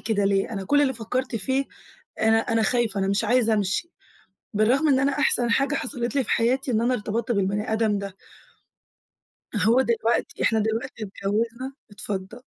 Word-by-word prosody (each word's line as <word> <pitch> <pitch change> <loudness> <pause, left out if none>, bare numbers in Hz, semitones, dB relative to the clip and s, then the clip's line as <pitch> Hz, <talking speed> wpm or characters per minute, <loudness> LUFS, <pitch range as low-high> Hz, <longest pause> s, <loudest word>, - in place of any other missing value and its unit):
كده 205 -3 0
ليه، 195 +2 +1
أنا 195 -3 -4
كُلّ 290 +9 +3
اللي 265 -2 +2
فكرت 245 +2 -3
فيه 265 +6 0 0.6
أنا 220 0 +4
أنا 225 0 0
خايفة، 225 -3 +1
أنا 195 - 0
مش 200 +3 +1
عايزة 230 -1 +3
أمشي، 205 - -1 0.7
بالرغم 250 +9 +3
إن 265 -2 +4
أنا 275 +1 +2
أحسن 245 -4 +2
حاجة 275 +4 +2
حصلت 245 -2 -3
لي 270 - +2
في - - -7
حياتي 255 +3 +1
إن 225 -2 +2
أنا 245 +2 +2
ارتبطت 230 +2 -2
بالبني 200 +1 -1
آدم 220 -2 +1
ده. 200 -1 -7 1.4
هو 230 +5 +4
دلوقتي 235 -2 0
إحنا 225 - +3
دلوقتي 220 +1 -2
اتجوزنا 225 +6 -3 0.2
اتفضل. 205 +2 -5
230 Hz, 165 wpm, -24 LUFS, 210-255 Hz, 1.4 s, أنا